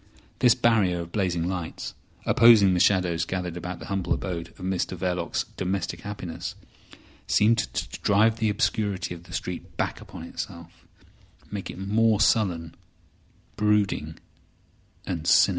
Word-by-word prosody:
This 125 -3 +6
barrier 100 -7 +2
of 85 0 -8
blazing 90 -4 0
lights, 90 -3 -4 0.3
opposing 110 -5 +7
the 90 - +1
shadows 90 -3 +3
gathered 90 -1 -3
about 90 +1 -5
the - - -9
humble 95 -3 -1
abode 85 -3 -3
of - - -22
Mr 95 0 -1
Verloc's 90 0 -1
domestic 95 +1 -2
happiness, 100 -5 -6 0.7
seemed 115 +2 +4
to 115 - -3
drive 110 +2 +3
the 110 -1 +2
obscurity 100 -4 0
of 85 0 -11
the - - -14
street 90 -1 -5
back - - -2
upon - - -10
itself, 85 0 -8 0.6
make 100 -2 -5
it - - -7
more 105 +2 +2
sullen, 90 -8 +2 0.8
brooding, 105 -7 +1 0.9
and 85 -4 -3
sinister. - - +6
95 Hz, 140 wpm, -26 LUFS, 85-105 Hz, 0.9 s, opposing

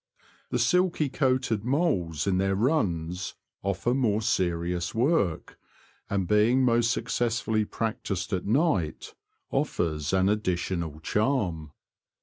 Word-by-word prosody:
The - - 0
silky 180 -5 +2
coated 130 -6 0
moles 100 - 0
in 95 -2 +1
their 95 0 +1
runs 90 - -1 0.3
offer 100 +5 0
more 110 -5 +1
serious 85 -1 -1
work, 115 - 0 0.5
and 95 -3 -1
being 115 +6 +4
most 120 -1 +3
successfully 115 -2 0
practised 100 -4 -3
at 95 0 -2
night, 115 - 0 0.4
offers 75 -3 -1
an 95 0 +3
additional 85 -6 -1
charm. 95 - -1
100 Hz, 110 wpm, -27 LUFS, 85-120 Hz, 0.5 s, being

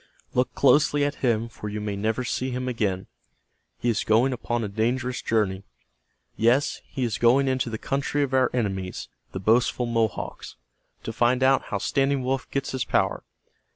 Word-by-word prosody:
"Look 125 0 0
closely 145 +1 +4
at 145 - -1
him 115 -3 +1
for 110 -2 -7
you 105 +1 -4
may 105 -1 -3
never 110 +5 -1
see 130 +1 -2
him 125 0 -3
again. 100 -6 -1 0.7
He - - -3
is 115 -3 +1
going 120 +5 +3
upon 120 -1 -2
a - - -2
dangerous 120 +4 -1
journey, 100 -4 0 0.7
Yes, 125 +6 +2
he 135 - -4
is 115 -1 -1
going 130 +4 +4
into 130 -2 0
the 110 - -4
country 140 +4 -1
of 135 -1 -3
our 130 -1 +4
enemies, 95 -6 -3 0.2
the 95 - -5
boastful 115 +5 +2
Mohawks, 115 -3 -2 0.5
to 115 - -5
find 120 +3 +2
out 135 +1 +4
how 100 - -2
Standing 135 +5 0
Wolf 130 0 -2
gets 140 0 -2
his 130 -2 -1
power. - - 0
120 Hz, 175 wpm, -25 LUFS, 110-130 Hz, 0.7 s, closely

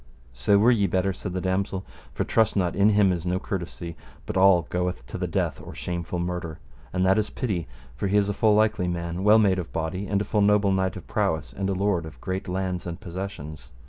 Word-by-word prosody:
So 65 +12 +3
were 110 +5 +5
ye 105 -5 +3
better, 95 +2 +1
said 90 0 -6
the 90 - -2
damosel; 95 0 -1 0.3
for - - -1
trust 110 -1 +2
not, 90 -4 +1
in 100 +2 +5
him 105 -2 +4
is 85 -2 -2
no 90 +1 0
courtesy, 85 -3 -5 0.3
but - - -5
all 95 -2 +6
goeth 90 0 -2
to - - -6
the - - -1
death - - -1
or - - -9
shameful 85 0 -4
murder, 85 -2 -3 0.3
and 90 0 +1
that 95 +3 +4
is 105 - -1
pity, 100 - -2 0.3
for 85 - -2
he 100 +2 +2
is 100 -1 +3
a 100 - 0
full 105 +1 +3
likely 110 -4 +2
man, 85 +1 -3
well 105 +2 +7
made 100 -4 +3
of 85 - -6
body, 85 +5 -3
and 100 0 +1
a 105 - -2
full 105 +1 +1
noble 100 -1 +4
knight 95 -2 0
of - - -8
prowess, 80 -1 -1
and 95 0 -2
a - - +1
lord 95 -4 0
of 75 -5 -12
great 95 +6 -4
lands 90 -1 -2
and 85 0 -5
possessions. 80 -7 -7
95 Hz, 235 wpm, -25 LUFS, 85-100 Hz, 0.3 s, well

